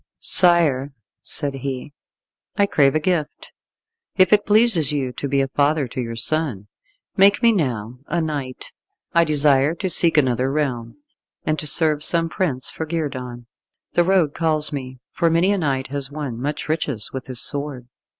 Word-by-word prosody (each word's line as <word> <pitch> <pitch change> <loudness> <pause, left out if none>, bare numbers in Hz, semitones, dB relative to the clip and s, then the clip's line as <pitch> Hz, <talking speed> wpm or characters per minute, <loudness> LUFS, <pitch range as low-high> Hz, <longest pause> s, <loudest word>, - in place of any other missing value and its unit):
"Sire," 155 -7 +2 0.3
said 145 -3 -4
he, 135 +1 -6 0.6
"I 200 - +4
crave 140 -7 +2
a - - +3
gift. 155 -2 -2 0.7
If 185 -1 +5
it 205 0 +3
pleases 205 - +4
you 135 -4 -2
to 140 - -5
be 140 0 +1
a 135 - 0
father 145 0 +1
to 130 - -4
your 115 -1 -5
son, 130 -5 -2 0.5
make 200 +4 +4
me 235 - +6
now 125 - -2
a 170 - -1
knight. 145 -5 -4 0.4
I 170 - +5
desire 150 -1 +2
to 185 +2 -3
seek 165 -2 +2
another 130 -2 +2
realm, 135 -6 -2 0.5
and 155 0 0
to 150 - -2
serve 150 0 +2
some 165 0 +3
prince 145 -8 -1
for 160 - -5
guerdon. 130 -7 -4 0.5
The 175 - +3
road 175 -5 +2
calls 155 -2 +1
me, 130 -2 -6
for 170 -2 +1
many 170 +4 +2
a 205 - +1
knight 135 -5 -1
has 140 -1 -3
won 140 -6 -5
much 145 +2 -3
riches 150 -8 -2
with 130 -1 -6
his 130 -2 -3
sword." 140 -4 -4
145 Hz, 170 wpm, -21 LUFS, 130-165 Hz, 0.7 s, me